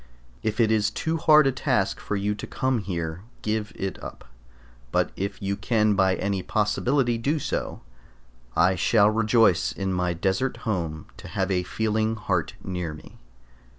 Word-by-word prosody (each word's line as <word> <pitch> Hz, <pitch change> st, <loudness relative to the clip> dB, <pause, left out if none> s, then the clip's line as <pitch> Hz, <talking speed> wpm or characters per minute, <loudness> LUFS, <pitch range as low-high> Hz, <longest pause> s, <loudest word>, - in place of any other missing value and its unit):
If 110 Hz, +1 st, -2 dB
it 110 Hz, -2 st, +4 dB
is 105 Hz, -2 st, +3 dB
too 160 Hz, 0 st, -2 dB
hard 155 Hz, -2 st, +6 dB
a 135 Hz, -, +4 dB
task 130 Hz, -, 0 dB
for 105 Hz, -, -3 dB
you 100 Hz, +1 st, 0 dB
to 105 Hz, -, -7 dB
come 130 Hz, -2 st, 0 dB
here, 85 Hz, -4 st, -4 dB, 0.2 s
give 110 Hz, 0 st, -1 dB
it 95 Hz, -1 st, -5 dB
up; -, -, -9 dB, 0.7 s
but -, -, +1 dB
if 100 Hz, +1 st, -4 dB
you 100 Hz, +1 st, 0 dB
can 110 Hz, -1 st, +2 dB
by 95 Hz, -1 st, +3 dB
any 100 Hz, -1 st, -1 dB
possibility 120 Hz, +5 st, +1 dB
do 145 Hz, +7 st, 0 dB
so, 145 Hz, -, -3 dB, 0.7 s
I 90 Hz, +3 st, +4 dB
shall 100 Hz, +3 st, +4 dB
rejoice 110 Hz, -4 st, +3 dB
in 95 Hz, -1 st, -2 dB
my 90 Hz, -1 st, 0 dB
desert 95 Hz, +9 st, 0 dB
home 85 Hz, -8 st, -2 dB
to -, -, -10 dB
have 95 Hz, 0 st, -1 dB
a 90 Hz, -1 st, +2 dB
feeling 110 Hz, +4 st, 0 dB
heart 95 Hz, -6 st, -1 dB
near 90 Hz, -4 st, -4 dB
me. 75 Hz, -, -15 dB
105 Hz, 165 wpm, -25 LUFS, 95-115 Hz, 0.7 s, hard